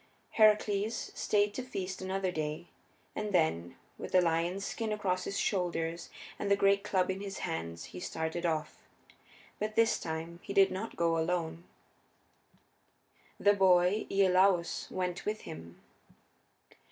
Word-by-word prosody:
Heracles 215 0 +2
stayed 205 -1 +1
to 255 - -3
feast 190 -8 -5
another 190 0 -1
day, 155 -1 -3 0.5
and 210 -1 -3
then, 85 - +1 0.2
with - - -7
the 185 - +7
lion's 170 +3 0
skin 225 -2 -3
across 190 -3 -1
his 200 - -3
shoulders 170 -3 -1 0.3
and 200 - -2
the 200 - +5
great 200 0 +3
club 190 -3 +1
in 190 +1 -5
his 200 -1 -5
hands, 85 +1 -4
he 90 - -6
started 160 - -3
off. 155 -3 -2 0.8
But 215 +1 -3
this 230 -1 +3
time 165 +1 -5
he 200 - -6
did 195 -1 +6
not 210 +5 -5
go 165 -1 +1
alone; 170 0 -2 1.7
the 205 - +5
boy 190 +1 +3
Iolaus 185 -2 +3
went 180 -1 -3
with 215 +1 -3
him. 80 +2 -10
185 Hz, 140 wpm, -31 LUFS, 165-200 Hz, 1.7 s, the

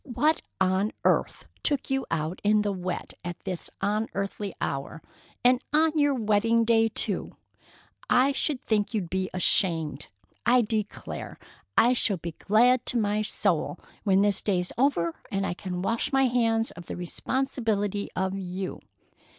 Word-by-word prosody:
"What 290 +4 +1 0.2
on 190 +3 +2
earth - - +1 0.2
took 285 -3 0
you 270 0 0
out 160 +2 -2
in 210 0 +4
the 205 - 0
wet 185 -1 -4
at 175 -1 -5
this 185 -3 -4
unearthly 205 -1 -2
hour? 140 +3 -3 0.5
And 250 0 +5
on 315 +2 +4
your 290 -2 +3
wedding 225 0 +2
day, 225 0 +4
too! - - -1 0.7
I 260 +3 +5
should 280 -1 0
think 210 0 0
you'd 180 -6 -2
be 190 0 -1
ashamed! 170 -3 +1 0.4
I 245 +1 +5
declare 215 -1 -4 0.4
I 245 +2 +6
shall 210 -5 +1
be 170 0 -5
glad 240 +8 +3
to 245 - 0
my 210 -1 +1
soul 215 - 0 0.3
when 195 -1 +4
this 205 -1 +2
day's 180 -3 0
over 200 - +1
and 195 0 0
I - - -1
can 180 0 -5
wash 230 +7 0
my 270 -1 +4
hands 230 -2 +1
of 170 0 -11
the - - -5
responsibility 205 +1 -1
of 190 +1 -1
you. 185 0 -4
210 Hz, 150 wpm, -27 LUFS, 185-240 Hz, 0.7 s, I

